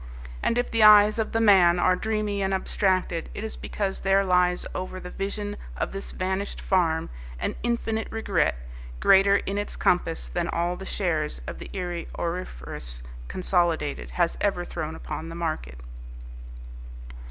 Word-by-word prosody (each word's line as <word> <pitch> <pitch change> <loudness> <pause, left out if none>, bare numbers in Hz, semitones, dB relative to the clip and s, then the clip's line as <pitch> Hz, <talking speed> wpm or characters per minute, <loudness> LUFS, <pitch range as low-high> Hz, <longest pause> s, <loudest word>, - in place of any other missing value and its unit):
And 235 - +1
if 245 - 0
the 230 - +1
eyes 210 +1 +8
of 220 - -1
the 225 - +1
man 190 -6 +6
are 185 +1 +3
dreamy 210 0 -1
and 195 0 +1
abstracted, 185 -3 0
it - - -5
is 220 - -4
because 195 -2 -3
there 195 0 +3
lies 180 -1 +2
over 185 0 -4
the 180 0 -8
vision 205 +1 -4 0.2
of - - -2
this 195 0 -6
vanished 190 +2 -2
farm 165 - +1 0.3
an - - -2
infinite 225 -2 -1
regret, 200 - +1 0.4
greater 195 +1 +6
in 200 +1 -3
its 205 - -4
compass 60 - +1
than - - -2
all 175 +1 -1
the 190 +1 -8
shares 160 - -1
the - - -7
Erie 175 -3 -4
Auriferous 60 - -5 0.2
Consolidated 175 -5 0
has 175 -2 0
ever 190 -4 0
thrown 160 -2 -5
upon 160 0 -6
the 165 - -7
market. 155 - -3
185 Hz, 155 wpm, -26 LUFS, 170-205 Hz, 0.4 s, eyes